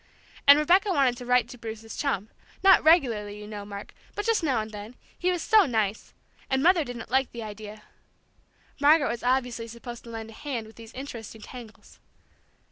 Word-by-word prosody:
And 285 +1 +10
Rebecca 360 +7 +4
wanted 275 -8 +3
to 245 -1 -9
write 250 -2 +3
to 245 - -11
Bruce's 225 0 -7
chum, 220 -8 -2 0.3
not 385 -1 +7
regularly, 230 -11 +3
you 210 - -9
know, 210 -1 -7
Mark, 200 0 -8 0.2
but 415 - -3
just 455 -3 +2
now 270 -8 +1
and 215 0 -5
then, 210 +3 -9 0.2
he 360 - 0
was 350 -3 -2
so 430 -4 +5
nice! 220 -4 -2 0.3
And 265 0 +1
Mother 350 -1 +5
didn't 240 -4 -8
like 265 0 +2
the 235 -1 -6
idea. 210 0 -9 1.0
Margaret 290 +1 +5
was 235 - -5
obviously 245 -2 0
supposed 235 +1 -9
to - - -10
lend 225 -1 -7
a - - -13
hand 245 -3 -5
with 220 - -15
these 225 -1 -12
interesting 230 -5 -8
tangles. 235 -2 -12
240 Hz, 190 wpm, -27 LUFS, 220-285 Hz, 1.0 s, And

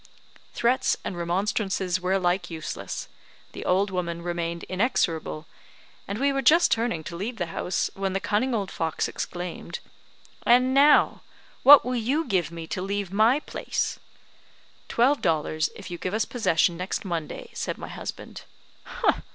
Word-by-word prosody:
Threats 245 +2 +2
and - - -4
remonstrances 185 +1 -1
were 180 +1 0
alike 180 -1 +1
useless, 160 -2 -5 0.4
the - - -7
old 195 +2 +2
woman 170 -2 -3
remained 170 -1 -3
inexorable; 170 - -1 0.6
and 200 - -3
we 280 +3 +2
were 275 - 0
just 325 +7 +5
turning 225 -8 0
to 170 - -7
leave 220 +7 -4
the 175 - -1
house, 180 - -1
when 195 -1 -2
the 195 - 0
cunning 235 +6 0
old 200 -3 -2
fox 160 -1 -1
exclaimed, 175 -1 -5 0.7
"And 250 +2 +4
now, 285 +2 +5 0.4
what 280 -2 +9
will 250 0 -1
you 265 +8 0
give 185 - 0
me 165 -1 -7
to 185 +3 -4
leave 195 -1 -3
my 225 +8 +4
place?" - - -3 0.9
"Twelve 265 +5 +2
dollars, 155 -1 +1
if - - -9
you 175 - -5
give 185 +3 -2
us 220 - +1
possession 170 -7 +1
next 185 +5 -3
Monday," 170 -4 -4
said - - -3
my - - -7
husband. - - -8
190 Hz, 150 wpm, -26 LUFS, 170-235 Hz, 0.9 s, what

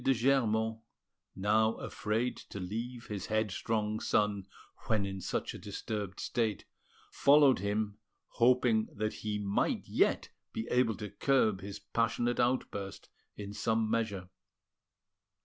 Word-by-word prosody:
de 135 - +4
Germont, 110 -3 +2 0.6
now 110 +3 +3
afraid 115 +2 -2
to 100 - -9
leave 115 +6 -5
his 100 -3 -5
headstrong 110 0 0
son 105 -2 +1 0.4
when 105 -3 +2
in 95 -1 -5
such - - -2
a - - -8
disturbed 105 -4 -5
state, 110 -4 -1 0.5
followed 140 -4 +6
him, 105 +1 -1 0.3
hoping 120 -2 +3
that 110 +1 -2
he 105 -1 -1
might 100 -1 0
yet - - +2 0.2
be 110 - -3
able 125 -3 +3
to 105 - -5
curb 110 -5 +2
his 100 0 -6
passionate 120 0 0
outburst 100 -6 -1 0.3
in 100 -1 -6
some 110 +1 +1
measure. 105 -5 -1
110 Hz, 125 wpm, -32 LUFS, 100-115 Hz, 0.6 s, followed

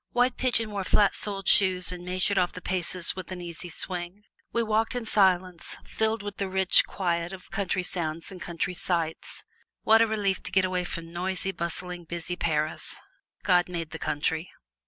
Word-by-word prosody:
White 245 +1 +3
Pigeon 230 -4 +1
wore 200 -2 -2
flat 205 +2 +3
soled 195 -2 -4
shoes 185 -2 +5
and 180 -1 -7
measured 185 +2 +1
off 180 -1 +1
the - - -7
paces 180 -1 +3
with 185 -1 -7
an 185 - -5
easy 175 0 -7
swing. 180 +3 -3 0.3
We 235 - +1
walked 220 +2 0
in 245 -2 -3
silence, 185 -4 +1
filled 220 -1 -1
with 205 -1 -6
the 195 -1 -2
rich 190 0 +5
quiet 170 -2 -1
of 190 -1 -11
country 190 -2 -1
sounds 165 -1 -2
and 185 -2 -10
country 175 +1 -3
sights. 170 -2 -2 0.4
What 225 +1 +6
a 230 - +5
relief 205 -3 0
to - - -2
get 190 0 +3
away 180 -1 -1
from 170 -1 -6
noisy, 190 +2 -2
bustling, 175 0 -4
busy 170 +1 -4
Paris! 155 -2 -2 0.5
God 180 -2 +3
made 170 -3 -4
the 160 - -6
country! 160 +3 -1
185 Hz, 180 wpm, -27 LUFS, 175-200 Hz, 0.5 s, What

